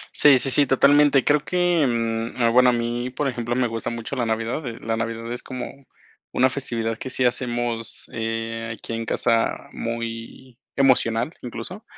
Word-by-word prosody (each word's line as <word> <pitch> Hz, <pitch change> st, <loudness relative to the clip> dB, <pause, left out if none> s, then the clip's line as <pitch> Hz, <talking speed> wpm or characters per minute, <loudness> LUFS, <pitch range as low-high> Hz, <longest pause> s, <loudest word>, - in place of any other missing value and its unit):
Sí, 140 Hz, -3 st, +7 dB
sí, 135 Hz, +1 st, +1 dB
sí, 145 Hz, +1 st, +4 dB
totalmente. 140 Hz, 0 st, +5 dB
Creo 150 Hz, 0 st, +4 dB
que, 175 Hz, -4 st, +2 dB
mm, 115 Hz, 0 st, -2 dB
ah, 115 Hz, -, +5 dB
bueno, 125 Hz, +1 st, +5 dB
a -, -, +4 dB
mí, 120 Hz, +1 st, -2 dB
por 140 Hz, +3 st, -2 dB
ejemplo, 120 Hz, -2 st, -2 dB
me 130 Hz, -, +2 dB
gusta 115 Hz, 0 st, -3 dB
mucho 115 Hz, +3 st, -5 dB
la 120 Hz, -3 st, -1 dB
Navidad, 115 Hz, +6 st, -2 dB
eh, 115 Hz, -, -6 dB
la 115 Hz, 0 st, -2 dB
Navidad 115 Hz, 0 st, -4 dB
es 125 Hz, -, -6 dB
como 130 Hz, -2 st, -6 dB, 0.6 s
una 130 Hz, +1 st, +3 dB
festividad 115 Hz, -5 st, -3 dB
que 130 Hz, -, -5 dB
sí 130 Hz, 0 st, 0 dB
hacemos, 120 Hz, -2 st, -1 dB
eh, 115 Hz, 0 st, -3 dB
aquí 115 Hz, -, -7 dB
en 115 Hz, 0 st, -3 dB
casa 115 Hz, 0 st, 0 dB
muy 115 Hz, +2 st, -6 dB, 0.2 s
emocional, 125 Hz, -2 st, +2 dB
incluso. 125 Hz, -, -7 dB
120 Hz, 175 wpm, -23 LUFS, 115-130 Hz, 0.6 s, Sí